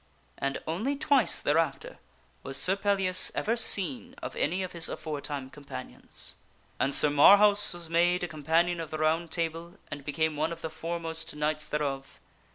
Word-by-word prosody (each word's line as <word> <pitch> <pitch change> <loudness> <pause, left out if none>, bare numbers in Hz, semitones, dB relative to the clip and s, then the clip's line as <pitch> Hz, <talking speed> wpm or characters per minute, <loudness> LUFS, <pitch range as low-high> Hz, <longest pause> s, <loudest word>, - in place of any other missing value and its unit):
And 135 0 -3
only 215 - -3
twice 280 -3 +2
thereafter 145 -2 -2 0.4
was 135 0 0
Sir 190 - +4
Pellias 195 -2 +2
ever 225 +2 -1
seen 240 +3 +2
of - - -8
any 180 +5 -2
of 185 - -7
his 170 -1 +1
afore 155 -2 -6
time 140 -3 -6
companions. 140 - -8 0.5
And 135 - 0
Sir 150 - +8
Marhaus 205 +7 +6
was 175 -2 -7
made 175 +2 +1
a - - -2
Companion 165 +3 -1
of 165 -2 -6
the 155 - -6
Round 160 +2 -1
Table 165 +1 -4 0.2
and 145 -1 -8
be 150 - -5
er 160 0 0
me 150 - -10
one 160 +2 -1
of 165 0 -9
the 160 - -5
foremost 165 -1 -4
knights 150 0 -2
thereof. 140 -3 -5
165 Hz, 175 wpm, -27 LUFS, 150-185 Hz, 0.5 s, Sir